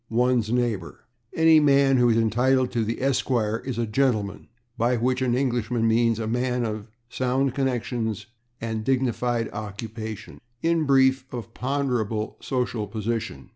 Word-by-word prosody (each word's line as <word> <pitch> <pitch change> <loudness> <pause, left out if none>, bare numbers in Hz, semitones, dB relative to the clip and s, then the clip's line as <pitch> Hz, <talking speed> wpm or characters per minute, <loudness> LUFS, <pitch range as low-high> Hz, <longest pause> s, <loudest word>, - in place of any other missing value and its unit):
one's 120 -1 +1
neighbor. 120 -8 -2 0.3
Any 160 -1 +6
man 140 -2 +4
who 120 -1 +4
is 115 - +3
entitled 125 +3 +2
to 115 -2 0
the 115 +2 -2
/Esq./ 120 -4 0
is 130 -4 -3
a 120 - 0
/gentleman/, 110 -3 0 0.3
by 120 +1 +1
which 125 +2 0
an 125 -2 +1
Englishman 120 -3 0
means 115 0 +3
a 115 - -3
man 125 +2 0
of 110 -1 -4 0.2
sound 130 +2 0
connections 120 -5 -2 0.3
and 110 -1 -3
dignified 120 -2 0
occupation 110 +1 -7 0.2
in 165 -1 +2
brief, 130 -1 +3
of 120 -5 -7
ponderable 125 -5 -2
social 120 -5 -2
position. 110 - -4
120 Hz, 140 wpm, -25 LUFS, 110-130 Hz, 0.3 s, Any